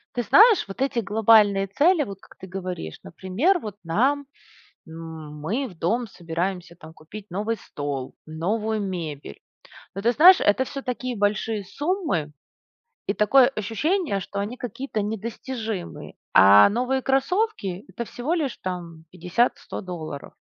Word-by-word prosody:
Ты 245 - 0
знаешь, 430 - +6
вот 195 +6 -8
эти 270 -3 +1
глобальные 210 -2 +4
цели, 300 - +3
вот 195 -4 -8
как - - -19
ты 190 - -10
говоришь, 180 - -6
например, 210 - 0
вот 210 -5 -8
нам, 270 +12 +1 0.6
м, 160 -2 -9
мы 230 - -2
в 180 - -15
дом 230 +8 0
собираемся, 175 -1 -4
там, 160 -1 -13
купить 195 +6 -11
новый 215 +5 -2
стол, 145 -7 -6
новую 210 +7 -2
мебель, 160 - -5 0.5
но, 195 - -5
ты 235 - +3
знаешь, 360 +8 +8
это 205 +6 +3
всё 275 +1 -7
такие 250 -1 -4
большие 205 +1 0
суммы 290 - -2 0.7
и 200 - 0
такое 245 +5 +5
ощущение, 230 - -1
что 200 +2 -6
они 210 +5 -3
какие-то 250 -2 -4
недостижимые. 220 -1 -5 0.2
А 100 +2 +8
новые 250 +5 0
кроссовки- 270 - 0
это 215 +6 -5
всего 260 +9 -3
лишь 295 -7 -2
там 170 -3 -6
50-100 180 +7 -1
долларов, 165 -7 -7
205 Hz, 140 wpm, -24 LUFS, 175-250 Hz, 0.7 s, знаешь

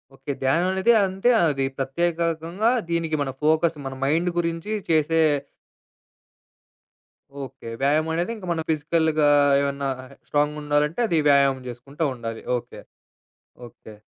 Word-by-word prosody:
Okay. 135 +1 -6
ధ్యానమనేది 185 - +2
అంతే 195 +5 0
అది 140 -4 +1
ప్రత్యేకకంగా 170 - 0 0.2
దీనికి 165 -2 -1
మన 135 - -1
ఫోకస్, 160 +1 +2
మన 135 - -4
మైండ్ 165 +5 +1
గురించి 170 +4 -2 0.2
చేసే 160 0 +2 2.2
ఓకే. 130 -2 -10
వ్యాయామమనేది 160 +7 +1
ఇంకా 190 -4 -9
మనం 165 -1 -1
ఫిజికల్‌గా 155 0 +1 0.3
ఏమన్నా 140 0 -2 0.4
స్ట్రాంగ్‌గుండాలంటే, 150 +2 0
అది 165 -4 +1
వ్యాయామం 140 -2 +4
చేసుకుంట 130 +5 -12
ఉండాలి. 115 -2 -6 0.2
ఓకే. - - -10 0.9
ఓకే. 110 -1 -15
155 Hz, 105 wpm, -23 LUFS, 140-170 Hz, 2.2 s, వ్యాయామం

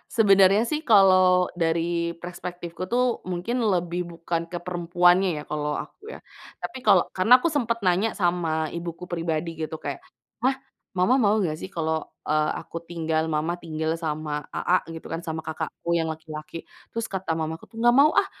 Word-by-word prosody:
Sebenernya 200 0 +5
sih 305 +5 -2
kalau 185 -3 +5
dari 170 0 0
perspektifku 175 0 -7
tuh, 245 0 +1
mungkin 225 +8 -2
lebih 180 -4 0
bukan 170 0 -3
ke 175 - -4
perempuannya 175 +1 +2
ya - - -4
kalau 150 -1 -2
aku 415 - -9
ya, - - -8 0.4
tapi 265 - -6
kalau - - +5
karena 220 +7 +6
aku 335 +6 0
sempet 230 -5 0
nanya 185 +5 +3
sama 175 -3 +1 0.2
ibuku 170 +1 -6
pribadi 165 -1 -2
gitu 155 0 -4
kayak, 140 - -5 0.4
"Mah 265 +2 +2 0.4
mama 185 +8 +4
mau 210 +1 +3
enggak 175 -7 0
sih 190 - -6
kalau, 160 -2 -1 0.2
eee, 155 0 +2
aku 165 - -8
tinggal, 160 -1 -1
mama 155 +2 0
tinggal 160 -1 -2
sama 150 -1 -2
Aa," 180 +1 +1
gitu 165 0 -8
kan 165 - -3
sama 160 -1 -5
kakakku 165 +2 -3
yang 165 -1 +1
laki-laki, 155 0 -7 0.2
terus 230 -1 -3
kata 180 -4 -2
mamaku 160 0 -5
tuh, 225 - -14
"Enggak 240 +1 +4
mau 305 - +6
ah, - - +5
175 Hz, 170 wpm, -25 LUFS, 160-190 Hz, 0.4 s, karena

